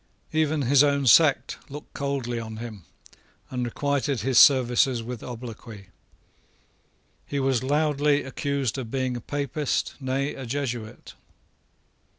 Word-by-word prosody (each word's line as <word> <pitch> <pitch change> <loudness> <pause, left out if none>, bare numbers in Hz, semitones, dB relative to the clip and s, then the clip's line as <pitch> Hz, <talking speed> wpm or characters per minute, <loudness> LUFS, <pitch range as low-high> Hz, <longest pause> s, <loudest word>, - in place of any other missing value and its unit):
Even 155 -1 +1
his 135 +2 +5
own 140 -1 +2
sect 140 +3 +4
looked 145 +2 -10
coldly 135 -4 -2
on 110 -1 -7
him, 110 -5 -8 0.7
and 125 -1 -2
requited 140 +1 -1
his 125 +1 +3
services 125 -2 +5
with 120 0 -6
obloquy. 115 -4 -9 1.4
He 140 - -2
was 135 -3 +1
loudly 145 +1 +1
accused 135 -1 -2
of 120 -4 -6
being 130 0 -1
a 120 - -5
Papist, 145 +2 -2
nay, 135 +1 -2
a 130 -2 -8
Jesuit. 120 -4 -5
130 Hz, 125 wpm, -25 LUFS, 120-140 Hz, 1.4 s, his